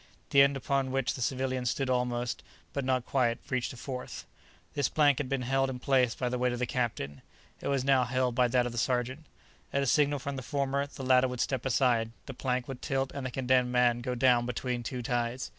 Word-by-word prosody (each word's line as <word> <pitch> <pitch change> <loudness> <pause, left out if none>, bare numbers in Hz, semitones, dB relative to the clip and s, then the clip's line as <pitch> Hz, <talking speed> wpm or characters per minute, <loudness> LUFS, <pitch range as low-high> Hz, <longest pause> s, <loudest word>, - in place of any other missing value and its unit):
The 140 - +7
end 140 0 +4
upon 135 0 0
which 135 -1 0
the 130 - -7
civilian 130 0 -1
stood 135 +2 0
almost, 125 -1 -1 0.3
but 140 - -2
not 130 -1 0
quite, 120 -4 +1
reached 130 -2 0
a 125 - -10
fourth. 125 +1 -6 0.5
This 145 -3 +1
plank 145 -3 +3
had 140 -3 -3
been 135 -2 -1
held 135 +1 +1
in 130 - -4
place 125 -2 +2
by 125 - -2
the 125 0 -2
weight 125 0 +1
of - - -3
the 125 - 0
captain; 115 - -3 0.4
it - - -4
was 135 -2 +1
now 135 -2 +4
held 125 0 0
by 125 +1 +3
that 125 0 +2
of 125 - -3
the 120 - -3
sergeant. 130 +5 -1 0.4
At 140 - +1
a - - 0
signal 145 +2 +3
from 140 0 -5
the - - -4
former 140 +2 -1
the 140 - -9
latter 130 0 +5
would 125 -1 -5
step 130 0 -1
aside, 120 -3 +2
the 135 - -7
plank 125 -1 -2
would 135 -2 -7
tilt 135 -1 -1
and 135 -2 -4
the - - -4
condemned 125 0 +1
man 120 -1 +3
go 125 0 -2
down 120 -1 +3
between 125 0 -2
two 125 +1 -5
ties. 120 +1 -2
130 Hz, 230 wpm, -30 LUFS, 125-135 Hz, 0.5 s, The